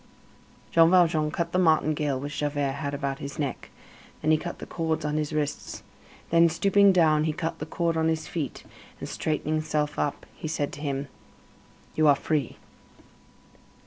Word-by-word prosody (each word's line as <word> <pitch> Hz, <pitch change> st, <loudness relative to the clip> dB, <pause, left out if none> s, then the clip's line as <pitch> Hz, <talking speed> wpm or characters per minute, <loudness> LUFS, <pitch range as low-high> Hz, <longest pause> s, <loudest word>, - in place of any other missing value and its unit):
Jean 165 Hz, 0 st, +6 dB
Valjean 165 Hz, -4 st, +4 dB
cut 170 Hz, +2 st, -2 dB
the 180 Hz, -, +1 dB
martingale 155 Hz, -4 st, +2 dB
which 145 Hz, +2 st, -5 dB
Javert 145 Hz, -2 st, 0 dB
had 140 Hz, -1 st, -2 dB
about 140 Hz, -1 st, -3 dB
his 140 Hz, 0 st, -7 dB
neck, 140 Hz, -5 st, -4 dB, 0.5 s
then 155 Hz, -, +3 dB
he 155 Hz, -, +5 dB
cut 175 Hz, +2 st, -6 dB
the -, -, -8 dB
cords 160 Hz, -1 st, -2 dB
on 150 Hz, 0 st, -1 dB
his 150 Hz, -1 st, -2 dB
wrists, 150 Hz, -1 st, -3 dB, 0.5 s
then, 170 Hz, 0 st, +6 dB
stooping 200 Hz, +3 st, +4 dB
down, 155 Hz, -4 st, +3 dB
he 160 Hz, -, +1 dB
cut 165 Hz, +1 st, -4 dB
the 155 Hz, -, -5 dB
cord 165 Hz, +1 st, -1 dB
on 160 Hz, 0 st, +1 dB
his 160 Hz, -1 st, -1 dB
feet; 155 Hz, -6 st, -4 dB, 0.4 s
and, -, -, -6 dB
straightening 155 Hz, 0 st, -2 dB
himself 150 Hz, -1 st, -1 dB
up, 145 Hz, -, -2 dB
he -, -, -7 dB
said 150 Hz, -2 st, -2 dB
to 145 Hz, -, -8 dB
him: 140 Hz, -1 st, -2 dB, 0.9 s
"You 155 Hz, -1 st, +3 dB
are 145 Hz, -, +7 dB
free." 145 Hz, -2 st, -2 dB
155 Hz, 175 wpm, -26 LUFS, 145-165 Hz, 0.9 s, are